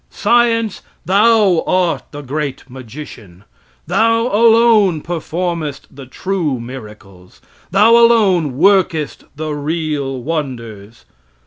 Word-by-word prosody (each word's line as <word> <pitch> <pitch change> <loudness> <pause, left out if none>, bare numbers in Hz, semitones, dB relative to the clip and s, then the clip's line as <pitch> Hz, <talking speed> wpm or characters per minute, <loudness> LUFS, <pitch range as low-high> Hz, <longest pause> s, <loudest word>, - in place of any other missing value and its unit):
Science, 230 -3 +1 0.2
thou 200 -1 +3
art 175 -6 +1
the 145 - -9
great 140 -1 -5
magician! 120 - -12 0.4
Thou 230 0 +1
alone 220 -6 +4
performest 170 -3 -4
the 135 -1 -12
true 165 -3 -3
miracles. 105 -7 -12 0.3
Thou 205 +5 +4
alone 195 - +3
workest 175 -4 +1
the 155 0 -4
real 145 -3 -3
wonders. 120 -8 -6
155 Hz, 95 wpm, -16 LUFS, 130-195 Hz, 0.4 s, alone